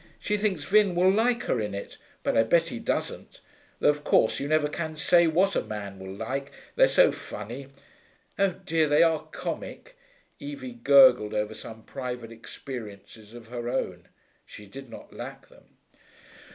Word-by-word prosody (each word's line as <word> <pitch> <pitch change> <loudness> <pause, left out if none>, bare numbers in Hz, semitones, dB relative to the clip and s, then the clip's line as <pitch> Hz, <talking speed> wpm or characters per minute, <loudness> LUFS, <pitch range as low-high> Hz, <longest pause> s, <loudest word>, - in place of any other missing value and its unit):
She 210 - -1
thinks 200 -7 0
Vin 200 +1 +3
will 185 +2 +5
like 235 +4 +2
her 125 - 0
in 105 -1 -3
it, 100 - -7 0.3
but - - 0
I - - +6
bet 165 +9 +2
he 115 - -5
doesn't. - - -3 0.4
Though, - - +4
of 150 0 0
course, 110 - +3
you 140 - -3
never 155 0 +2
can 155 +1 -5
say 170 +2 +4
what 185 +5 +2
a - - +2
man 100 -2 -7
will 95 0 -8
like, 135 +8 -4 0.2
they're - - +6
so - - +5
funny. 120 +6 -8 0.7
Oh 195 -2 +3
dear, 160 -4 +2
they 150 +3 +5
are 160 -2 +1
comic!' - - -6 0.4
Evie 285 -3 -7
gurgled 240 - +6
over 105 0 -1
some 110 0 -10
private 125 -3 -6
experiences 110 -2 -10
of 115 -1 -12
her 120 -1 -4
own: 90 -8 -3 0.4
she 105 - -12
did 135 +5 -11
not - - -12
lack - - -9
them. - - -20
140 Hz, 170 wpm, -27 LUFS, 110-180 Hz, 0.7 s, I